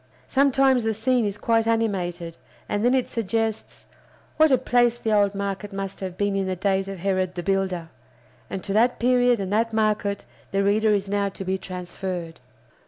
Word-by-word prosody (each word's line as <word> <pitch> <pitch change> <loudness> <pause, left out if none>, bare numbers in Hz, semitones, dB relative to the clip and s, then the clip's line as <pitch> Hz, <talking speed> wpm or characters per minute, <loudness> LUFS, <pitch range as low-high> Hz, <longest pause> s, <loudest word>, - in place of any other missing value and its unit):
Sometimes 270 -2 +3
the 220 -1 0
scene 245 +1 +1
is 200 0 -3
quite 225 0 +1
animated, 180 -7 -1 0.3
and 205 +1 -1
then 245 +2 +4
it 255 - +1
suggests, 225 0 -3 0.5
What 315 0 +6
a 260 - +6
place 240 -1 +2
the 220 -2 -1
old 205 -1 +3
market 200 +1 -4
must 195 0 -5
have 185 -2 -6
been 205 -1 0
in 195 -1 0
the 185 - -1
days 195 +1 0
of 195 -1 -6
Herod 185 0 -1
the 175 - -4
Builder! 190 -3 -1 0.6
And 190 - -5
to 195 - -3
that 235 +4 +3
period 245 -1 +3
and 195 0 -3
that 225 +1 +1
market 210 -2 0 0.2
the 195 0 0
reader 215 +2 +2
is 200 -1 +1
now 200 0 0
to 195 0 -8
be 190 +1 -1
transferred. 180 -2 -6
200 Hz, 185 wpm, -24 LUFS, 190-230 Hz, 0.6 s, What